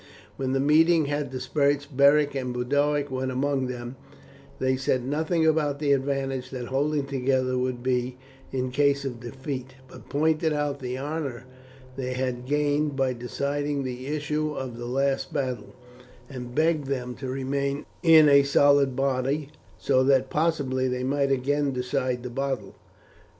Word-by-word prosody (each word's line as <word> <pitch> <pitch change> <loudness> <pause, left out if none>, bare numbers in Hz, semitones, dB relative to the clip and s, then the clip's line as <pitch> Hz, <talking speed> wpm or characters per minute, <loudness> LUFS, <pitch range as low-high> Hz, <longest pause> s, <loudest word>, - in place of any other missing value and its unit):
When 130 -1 -2
the 135 - +1
meeting 160 +3 +4
had 145 -1 -2
dispersed 140 +2 -1
Beric 140 +1 +5
and 130 -2 -3
Boduoc 145 +3 0
went 130 0 -2
among 135 0 0
them; 125 0 -6 0.6
they 130 0 +1
said 130 -1 0
nothing 160 +4 0
about 155 -3 +2
the 145 -1 0
advantage 135 -1 -1
that 125 -3 -6
holding 145 +2 0
together 130 -1 0
would 125 -1 -2
be 125 0 -1 0.3
in 130 -1 -2
case 140 +1 +2
of 125 -3 -4
defeat, 130 +1 -6
but - - -14
pointed 155 +2 +1
out 145 -1 -1
the 125 -1 -4
honour 140 -3 -4 0.5
they 130 -1 -3
had 125 -1 -3
gained 145 0 +1
by 135 -1 +1
deciding 140 +4 -2
the 130 0 -5
issue 150 0 -2
of 130 -3 -5
the 120 0 -6
last 135 +4 0
battle, 130 -7 -3 0.5
and 125 -2 -8
begged 155 -2 +2
them 125 -2 -3
to 130 -1 -5
remain 140 +2 -2 0.2
in 160 -3 +7
a 140 -1 +7
solid 140 -1 +4
body, 135 +2 0 0.3
so 130 - +2
that 135 -1 +3
possibly 145 -5 0
they 125 0 -2
might 140 +1 +1
again 140 +2 +1
decide 125 -1 -1
the 125 - -5
battle. 135 -5 -3
135 Hz, 155 wpm, -26 LUFS, 130-145 Hz, 0.6 s, in